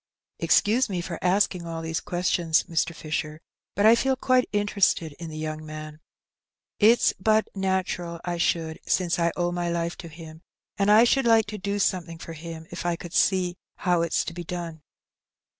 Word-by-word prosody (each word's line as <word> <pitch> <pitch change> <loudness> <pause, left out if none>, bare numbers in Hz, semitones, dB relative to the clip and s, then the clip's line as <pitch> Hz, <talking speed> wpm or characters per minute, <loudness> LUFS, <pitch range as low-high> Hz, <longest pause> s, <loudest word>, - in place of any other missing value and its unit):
" - - -61
Excuse 230 +4 +4
me 180 -3 -2 0.2
asking 180 -2 +1
all 165 -1 -5
these 160 0 -2
questions, 175 -4 +1
Mr. 165 -1 -1
Fisher, 155 0 -4 0.4
but 205 - +2
I 220 - +8
feel 265 +3 +2
quite 255 -1 +2
interested 200 -5 +1
in 165 -1 -6
the 155 - -8
young 155 0 -4
man. 155 0 -8 0.8
It's 225 +3 +5
but 215 +2 +2
natural 185 -3 -2
I 175 -1 -2
should, 165 -2 0
since 175 -2 +1
I 170 0 +2
owe 175 -1 0
my 175 -1 -2
life 170 0 -2
to 170 - -8
him; 160 0 -11 0.3
and 200 -1 +1
I 215 +2 +7
should 265 +2 +3
like 225 -2 +5
to 210 - -5
do 200 +2 -2
something 175 -4 -1
for 165 0 -8
him, 160 0 -8
if - - -5
I 175 -1 0
could 170 0 -10
see 180 -2 +2 0.2
how 180 -2 +1
it's 170 -1 +1
to - - -5
be 175 0 -6
done." 170 -2 -6
175 Hz, 185 wpm, -25 LUFS, 165-200 Hz, 0.8 s, I